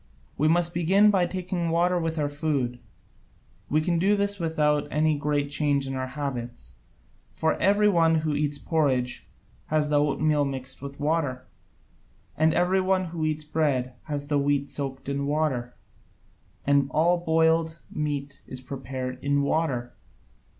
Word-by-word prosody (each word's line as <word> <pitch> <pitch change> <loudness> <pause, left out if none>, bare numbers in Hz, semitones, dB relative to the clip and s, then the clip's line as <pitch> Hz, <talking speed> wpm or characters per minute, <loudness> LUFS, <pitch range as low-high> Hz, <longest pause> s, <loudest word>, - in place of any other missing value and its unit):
We 155 - +2
must 170 +1 +2
begin 190 +5 +4
by 185 -3 +2
taking 180 -1 -3
water 175 +2 +2
with 165 -1 -2
our 150 -1 +1
food: 145 -5 -2 0.9
we 155 +2 +2
can 170 +1 0
do 200 +4 +3
this 200 0 0
without 150 -3 +1
any 155 +1 +2
great 145 0 -1
change 145 -2 +1
in 135 - -4
our 130 0 -3
habits. 120 - -6 0.6
For 160 - +1
every 205 +2 +4
one 165 -4 +4
who 155 -1 0
eats 145 0 0
porridge 135 -5 0 0.4
has 150 -1 +1
the 145 -1 +3
oatmeal 150 0 +2
mixed 130 -2 -4
with 140 0 -8
water, 145 -4 -1 0.9
and 160 +1 +3
every 180 +3 +2
one 185 0 +1
who 160 -2 -2
eats 155 0 -1
bread 145 -5 0
has 145 -1 -3
the 145 -1 +1
wheat 140 0 0
soaked 135 -2 -4
in 140 0 -2
water, 140 -5 -1 0.9
and 140 -1 +3
all 170 +5 +2
boiled 160 0 +2
meat 145 -2 -3
is 130 - -6
prepared 130 -1 -6
in 140 0 +2
water. 140 -5 -1
150 Hz, 150 wpm, -26 LUFS, 140-165 Hz, 0.9 s, begin